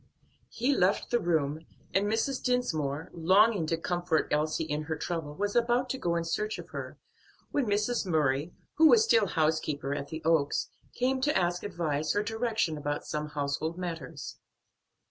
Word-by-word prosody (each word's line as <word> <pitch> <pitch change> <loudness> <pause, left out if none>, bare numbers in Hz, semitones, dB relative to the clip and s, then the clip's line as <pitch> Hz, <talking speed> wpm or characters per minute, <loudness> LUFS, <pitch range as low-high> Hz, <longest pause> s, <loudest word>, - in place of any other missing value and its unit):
He 255 +4 +1
left 190 0 +1
the 240 - +3
room, 160 -3 -1 0.3
and 195 +2 +2
Mrs. 225 +5 0
Dinsmore, 160 - -1
longing 190 +2 +4
to 165 - 0
comfort 175 -1 0
Elsie 155 +2 +1
in 150 -1 -2
her 160 +1 -2
trouble, 155 -1 -4
was 205 +3 -2
about 240 +2 +2
to 265 - -3
go 170 -7 0
in 170 - 0
search 210 +6 -2
of - - -9
her, - - -7 0.5
when 275 -5 0
Mrs. 210 +1 0
Murray, 150 -1 +1 0.3
who 320 - +8
was 440 +5 +6
still 225 - +4
housekeeper 155 -4 0
at 140 0 -4
the 160 +2 -7
Oaks, 160 -3 +2 0.3
came 260 +1 0
to 295 +2 +2
ask 175 -1 0
advice 155 -6 -1
or 205 - +2
direction 220 -7 -1
about 145 0 -3
some 150 0 -3
household 150 +3 -2
matters. 165 -7 -6
170 Hz, 165 wpm, -29 LUFS, 155-220 Hz, 0.5 s, who